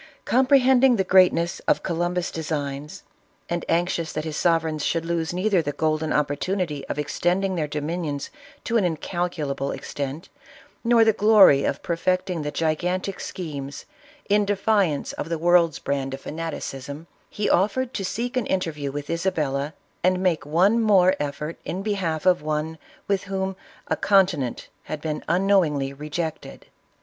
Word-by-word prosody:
Comprehend 260 Hz, 0 st, +4 dB
ing 260 Hz, -2 st, +6 dB
the 195 Hz, -, +1 dB
greatness 180 Hz, -2 st, +4 dB
of -, -, +2 dB
Columbus' 175 Hz, 0 st, -1 dB
designs, 150 Hz, -2 st, -4 dB, 0.4 s
and 170 Hz, 0 st, -2 dB
anxious 170 Hz, -1 st, 0 dB
that 155 Hz, -, -2 dB
his 155 Hz, -1 st, -4 dB
sovereigns 160 Hz, -3 st, +1 dB
should 165 Hz, -1 st, 0 dB
lose 165 Hz, -1 st, -1 dB
neither 185 Hz, +1 st, +2 dB
the 145 Hz, -2 st, -3 dB
golden 155 Hz, +1 st, 0 dB
opportunity 150 Hz, +1 st, -1 dB
of -, -, -4 dB
extending 175 Hz, +6 st, 0 dB
their 160 Hz, -4 st, -1 dB
dominions 150 Hz, -1 st, -3 dB, 0.3 s
to 230 Hz, -, +1 dB
an 175 Hz, -7 st, +1 dB
incal 175 Hz, +3 st, -2 dB
culable 140 Hz, -3 st, -3 dB
extent, 145 Hz, +5 st, -5 dB, 0.6 s
nor 235 Hz, -1 st, +5 dB
the 220 Hz, -, +4 dB
glory 205 Hz, -9 st, +6 dB
of 140 Hz, -, -2 dB
perfecting 185 Hz, 0 st, -1 dB
the 150 Hz, -, -3 dB
gigantic 180 Hz, +5 st, -1 dB
schemcs0n 185 Hz, -, -4 dB
defiance 200 Hz, -6 st, +1 dB
of 165 Hz, -, -5 dB
the 165 Hz, -, -1 dB
world's 170 Hz, -1 st, +3 dB
brand 135 Hz, -1 st, -2 dB
of 135 Hz, -, -13 dB
fanaticism, 150 Hz, -2 st, -6 dB, 0.2 s
he 210 Hz, -, -2 dB
offered 235 Hz, +7 st, +1 dB
to 195 Hz, -, -3 dB
seek 235 Hz, +7 st, -3 dB
an 250 Hz, -3 st, 0 dB
interview 155 Hz, -7 st, -2 dB
with 145 Hz, +1 st, -5 dB
Isabella, 155 Hz, -5 st, -1 dB, 0.3 s
and 185 Hz, +1 st, +3 dB
make 160 Hz, -7 st, +1 dB
one 190 Hz, +9 st, +3 dB
more 190 Hz, -4 st, +5 dB
effort 150 Hz, +2 st, -4 dB
in 190 Hz, +3 st, -4 dB
behalf 185 Hz, -6 st, -2 dB
of 180 Hz, -3 st, +4 dB
one 155 Hz, +1 st, -3 dB, 0.3 s
with 200 Hz, -1 st, 0 dB
whom 190 Hz, 0 st, -2 dB, 0.3 s
a -, -, +1 dB
continent 180 Hz, -, +2 dB, 0.2 s
had 155 Hz, -, -5 dB
been 150 Hz, 0 st, -4 dB
unknowingly 170 Hz, -7 st, +2 dB
rejected. 150 Hz, +3 st, -5 dB
170 Hz, 150 wpm, -24 LUFS, 150-190 Hz, 0.6 s, ing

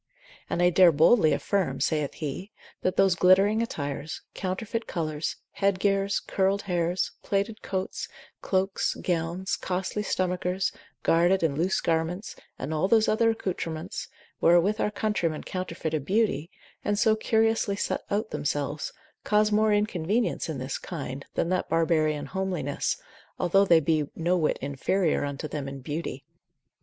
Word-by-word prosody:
And 175 Hz, -, +1 dB
I 175 Hz, -, +5 dB
dare 180 Hz, 0 st, +7 dB
boldly 160 Hz, +3 st, +5 dB
affirm 145 Hz, -5 st, 0 dB
(saith 150 Hz, 0 st, 0 dB
he) 160 Hz, +7 st, -5 dB, 0.3 s
that 185 Hz, -, 0 dB
those 195 Hz, -2 st, +5 dB
glittering 195 Hz, +5 st, +4 dB
attires, 145 Hz, -7 st, -4 dB
counterfeit 210 Hz, +4 st, -3 dB
colours, 155 Hz, -3 st, -2 dB, 0.2 s
headgears, 195 Hz, 0 st, +2 dB
curled 195 Hz, +1 st, +1 dB
hairs, 175 Hz, -1 st, 0 dB
plaited 205 Hz, +2 st, -1 dB
coats, 190 Hz, -1 st, -3 dB, 0.3 s
cloaks, 190 Hz, 0 st, 0 dB
gowns, 175 Hz, +2 st, -1 dB
costly 190 Hz, +3 st, -2 dB
stomachers, 185 Hz, -1 st, -1 dB, 0.3 s
guarded 175 Hz, +3 st, +3 dB
and 150 Hz, -4 st, +1 dB
loose 175 Hz, +5 st, +1 dB
garments, 170 Hz, +5 st, -1 dB, 0.2 s
and 145 Hz, +4 st, -4 dB
all 155 Hz, +4 st, +1 dB
those 220 Hz, +1 st, +4 dB
other 225 Hz, +1 st, +3 dB
accoutrements, 175 Hz, -7 st, -3 dB, 0.3 s
wherewith 175 Hz, +6 st, +4 dB
our -, -, +2 dB
countrywomen 210 Hz, -7 st, -1 dB
counterfeit 185 Hz, -3 st, -4 dB
a 155 Hz, -, +1 dB
beauty, 185 Hz, -1 st, 0 dB, 0.3 s
and 205 Hz, 0 st, 0 dB
so 220 Hz, 0 st, +4 dB
curiously 220 Hz, -1 st, +1 dB
set -, -, -1 dB
out 215 Hz, +2 st, -1 dB
themselves, 145 Hz, 0 st, -2 dB, 0.3 s
cause 210 Hz, 0 st, +3 dB
more 215 Hz, +1 st, +3 dB
inconvenience 210 Hz, 0 st, 0 dB
in 155 Hz, -, -3 dB
this 130 Hz, +2 st, -4 dB
kind, 140 Hz, -6 st, -6 dB
than 170 Hz, -, 0 dB
that 185 Hz, 0 st, 0 dB
barbarian 155 Hz, -3 st, +2 dB
homeliness, 175 Hz, -4 st, -2 dB, 0.4 s
although 195 Hz, +3 st, +3 dB
they 170 Hz, -4 st, +6 dB
be 155 Hz, -1 st, +1 dB
no 170 Hz, +2 st, +1 dB
whit 160 Hz, -4 st, +1 dB
inferior 150 Hz, +6 st, 0 dB
unto 140 Hz, +1 st, -4 dB
them 145 Hz, -2 st, -4 dB
in 135 Hz, 0 st, -6 dB
beauty. 145 Hz, 0 st, -5 dB
180 Hz, 140 wpm, -27 LUFS, 155-200 Hz, 0.4 s, dare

